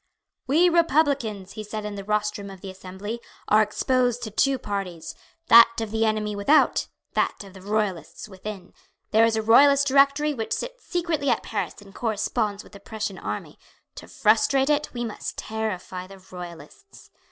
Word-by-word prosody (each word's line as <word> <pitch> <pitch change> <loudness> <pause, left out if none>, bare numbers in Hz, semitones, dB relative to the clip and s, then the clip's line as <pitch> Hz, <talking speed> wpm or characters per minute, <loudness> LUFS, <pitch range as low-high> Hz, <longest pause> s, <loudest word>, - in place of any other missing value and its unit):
"We 320 +7 +4
Republicans," 280 - +1
he 215 - -7
said 210 0 -6
in 210 - -4
the 200 -1 -6
rostrum 210 -1 -2
of 190 -2 -11
the 195 - -7
Assembly, 190 +5 -7 0.3
"are 215 +1 +5
exposed 245 +3 0
to 215 - -5
two 275 +6 +2
parties, 185 -7 -5 0.3
that 230 0 +8
of 225 -2 -4
the 225 0 +1
enemy 215 -1 -1
without, 275 +10 +3 0.3
that - - 0
of 195 -2 -13
the 190 - -12
Royalists 200 -4 -3
within. 195 -1 -9 0.4
There 225 +1 +5
is 230 -1 +1
a 220 - -1
Royalist 280 +5 +6
directory 280 +2 +3
which 225 -5 -3
sits - - -5
secretly 335 -6 -1
at - - +1
Paris 200 -5 -3
and 195 -1 -16
corresponds 215 -2 -2
with - - -18
the 200 - -11
Prussian 210 -1 -5
army. - - -6 0.3
To - - -11
frustrate 265 +6 +2
it 295 0 0
we 240 -1 -4
must 220 - -6
terrify 185 -4 -4
the 195 +1 -13
Royalists." 185 - -12
215 Hz, 170 wpm, -24 LUFS, 200-265 Hz, 0.4 s, that